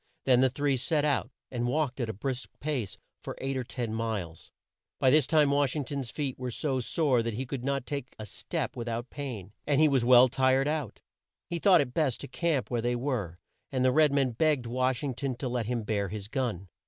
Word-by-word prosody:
Then 125 Hz, -2 st, +5 dB
the 130 Hz, -, +5 dB
three 140 Hz, +1 st, 0 dB
set 150 Hz, +3 st, +1 dB
out, 140 Hz, -4 st, +1 dB, 0.2 s
and 120 Hz, -1 st, -1 dB
walked 135 Hz, 0 st, 0 dB
at 120 Hz, -3 st, -1 dB
a -, -, -2 dB
brisk 130 Hz, +5 st, -4 dB
pace 135 Hz, -9 st, -3 dB, 0.2 s
for -, -, -7 dB
eight 135 Hz, 0 st, -2 dB
or 130 Hz, -, -1 dB
ten 120 Hz, -2 st, -4 dB
miles. 105 Hz, -8 st, -4 dB, 0.5 s
By 130 Hz, -, +4 dB
this 150 Hz, -1 st, +5 dB
time 150 Hz, -3 st, +4 dB
Wash 140 Hz, -1 st, +2 dB
ing 150 Hz, -, -1 dB
ton's 135 Hz, -3 st, -4 dB
feet 140 Hz, -2 st, -3 dB
were 125 Hz, -1 st, -3 dB
so 130 Hz, +2 st, -1 dB
sore 130 Hz, 0 st, +1 dB
that 115 Hz, -1 st, -3 dB
he 130 Hz, +4 st, -3 dB
could 130 Hz, -1 st, -5 dB
not 140 Hz, -1 st, -1 dB
take 140 Hz, -2 st, -5 dB
a 110 Hz, -, -7 dB
step 105 Hz, -, -4 dB
with 120 Hz, -1 st, -5 dB
out 120 Hz, +2 st, -4 dB
pain, 120 Hz, -9 st, -6 dB, 0.2 s
and 145 Hz, -1 st, +3 dB
he 155 Hz, -, +6 dB
was 135 Hz, -4 st, +2 dB
well 125 Hz, +1 st, +7 dB
tired 130 Hz, +1 st, +2 dB
out. 150 Hz, -7 st, -3 dB, 0.4 s
He 170 Hz, -1 st, -4 dB
thought 180 Hz, -2 st, +6 dB
it 125 Hz, -3 st, -4 dB
best 140 Hz, -6 st, +1 dB
to -, -, -6 dB
camp 150 Hz, -2 st, -1 dB
where 120 Hz, -1 st, 0 dB
they 120 Hz, +1 st, 0 dB
were, 120 Hz, -, -2 dB, 0.3 s
and 130 Hz, -2 st, +1 dB
the 130 Hz, -, +5 dB
red 155 Hz, +1 st, +4 dB
man 135 Hz, -2 st, +2 dB
begged 145 Hz, 0 st, +1 dB
Wash 125 Hz, +1 st, 0 dB
ing 140 Hz, -3 st, -1 dB
ton 130 Hz, +1 st, -3 dB
to 130 Hz, -, -4 dB
let 120 Hz, -3 st, -2 dB
him 120 Hz, -2 st, -1 dB
bear 105 Hz, -2 st, -1 dB
his 105 Hz, -1 st, -6 dB
gun. 115 Hz, -7 st, -2 dB
130 Hz, 230 wpm, -29 LUFS, 120-140 Hz, 0.5 s, well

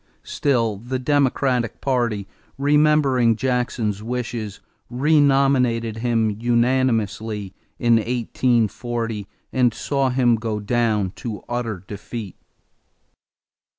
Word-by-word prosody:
Still 115 Hz, -7 st, 0 dB
the 120 Hz, +5 st, -4 dB
Democratic 130 Hz, -3 st, +1 dB
party, 120 Hz, -7 st, -1 dB, 0.3 s
remembering 140 Hz, -4 st, +3 dB
Jackson's 120 Hz, -4 st, -1 dB
wishes, 115 Hz, -3 st, -4 dB, 0.3 s
renominated 135 Hz, -4 st, +2 dB
him 115 Hz, -2 st, +1 dB
unanimously 115 Hz, -3 st, 0 dB, 0.2 s
in 120 Hz, -1 st, +4 dB
1840 115 Hz, -2 st, -1 dB, 0.3 s
and 125 Hz, -2 st, +3 dB
saw 135 Hz, -2 st, 0 dB
him 125 Hz, -2 st, +3 dB
go 110 Hz, -1 st, -3 dB
down 105 Hz, -3 st, 0 dB
to 110 Hz, -4 st, -6 dB
utter 115 Hz, -6 st, -3 dB
defeat. 105 Hz, -1 st, -7 dB
120 Hz, 85 wpm, -22 LUFS, 110-130 Hz, 0.3 s, in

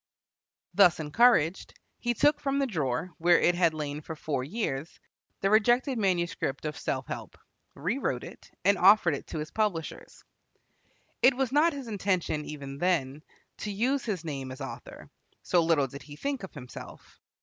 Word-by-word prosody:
Thus 190 Hz, -6 st, +5 dB
encouraged, 165 Hz, +1 st, +3 dB, 0.2 s
he 240 Hz, 0 st, -1 dB
took 295 Hz, +6 st, +3 dB
from 275 Hz, 0 st, -1 dB
the 280 Hz, -, +2 dB
drawer, 160 Hz, -, -2 dB
where 175 Hz, +1 st, +5 dB
it 175 Hz, -, +4 dB
had 170 Hz, -2 st, +2 dB
lain 150 Hz, -1 st, -4 dB
for 160 Hz, +1 st, -7 dB
four 145 Hz, -4 st, -2 dB
years, 155 Hz, -, -4 dB, 0.4 s
the 195 Hz, -, +2 dB
rejected 240 Hz, +4 st, +3 dB
manuscript 175 Hz, -8 st, -1 dB
of 150 Hz, -1 st, -3 dB
"Self -, -, -3 dB
Help," -, -, -7 dB, 0.4 s
rewrote 185 Hz, -, -2 dB
it, -, -, -12 dB, 0.2 s
and 200 Hz, -1 st, +4 dB
offered 190 Hz, -3 st, +6 dB
it 140 Hz, -, -6 dB
to -, -, -6 dB
his 155 Hz, +1 st, -5 dB
publishers. 205 Hz, -8 st, -3 dB, 1.0 s
It 255 Hz, 0 st, +6 dB
was 265 Hz, -2 st, 0 dB
not 305 Hz, +4 st, +4 dB
his 275 Hz, -3 st, -7 dB
intention, 185 Hz, -7 st, -1 dB
even 140 Hz, -2 st, -7 dB
then, 155 Hz, -6 st, 0 dB, 0.4 s
to 210 Hz, -, -4 dB
use 250 Hz, +7 st, 0 dB
his 190 Hz, -7 st, -3 dB
name 135 Hz, -4 st, -4 dB
as 130 Hz, -, -9 dB
author, 135 Hz, -1 st, -8 dB, 0.4 s
so 175 Hz, -, +3 dB
little 160 Hz, -4 st, +3 dB
did 140 Hz, +2 st, -9 dB
he 145 Hz, 0 st, -11 dB
think 275 Hz, -, -3 dB
of 190 Hz, -, -9 dB
himself. 125 Hz, -3 st, -11 dB
175 Hz, 165 wpm, -28 LUFS, 150-220 Hz, 1.0 s, offered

